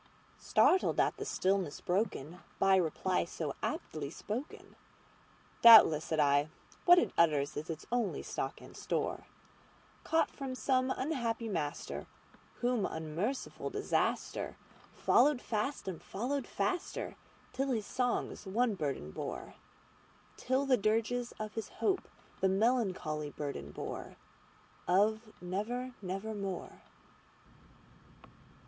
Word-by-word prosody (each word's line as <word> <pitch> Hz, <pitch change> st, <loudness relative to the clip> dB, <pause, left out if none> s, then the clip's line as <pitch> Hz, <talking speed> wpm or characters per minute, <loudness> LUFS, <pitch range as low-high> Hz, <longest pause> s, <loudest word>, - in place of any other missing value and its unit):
Startled 370 Hz, -, +3 dB
at -, -, +2 dB
the -, -, -4 dB
stillness 190 Hz, -5 st, 0 dB
broken 180 Hz, -4 st, -2 dB, 0.2 s
by 195 Hz, 0 st, +5 dB
reply 180 Hz, +1 st, +1 dB
so 160 Hz, -4 st, -4 dB
aptly 145 Hz, -3 st, -3 dB
spoken,"Doubtless," 220 Hz, -, +3 dB
said 160 Hz, -, -1 dB
I, 145 Hz, +1 st, +3 dB, 0.4 s
"what 355 Hz, 0 st, +9 dB
it -, -, +2 dB
utters 150 Hz, -4 st, +3 dB
is 150 Hz, +3 st, -5 dB
its 160 Hz, -1 st, -5 dB
only 240 Hz, -4 st, 0 dB
stock -, -, -4 dB
and -, -, -13 dB
store, -, -, -2 dB, 0.8 s
Caught 325 Hz, 0 st, +2 dB
from 270 Hz, -2 st, -5 dB
some 255 Hz, 0 st, +1 dB
unhappy 250 Hz, -5 st, -1 dB
master 155 Hz, -8 st, -3 dB, 0.5 s
whom 245 Hz, -3 st, +1 dB
unmerciful 160 Hz, -, -3 dB
DisasterFollowed 290 Hz, -3 st, 0 dB
fast 225 Hz, +2 st, -2 dB
and 185 Hz, -4 st, -4 dB
followed 250 Hz, +6 st, -3 dB
faster 205 Hz, -, -2 dB, 0.4 s
till 270 Hz, +1 st, -1 dB
his 225 Hz, -5 st, 0 dB
songs 245 Hz, -4 st, -1 dB
one 230 Hz, +4 st, +2 dB
burden 140 Hz, -, -3 dB
bore:Till 260 Hz, -, -6 dB
the 260 Hz, -2 st, +4 dB
dirges 225 Hz, +3 st, 0 dB
of 215 Hz, 0 st, -6 dB
his 225 Hz, -3 st, -4 dB
Hope 390 Hz, -2 st, -1 dB, 0.3 s
that 190 Hz, -, +3 dB
melancholy 190 Hz, -8 st, +1 dB
burden 140 Hz, -, -5 dB
boreOf -, -, -6 dB, 1.3 s
'Never—nevermore. 200 Hz, -1 st, -4 dB
210 Hz, 105 wpm, -33 LUFS, 165-245 Hz, 1.3 s, what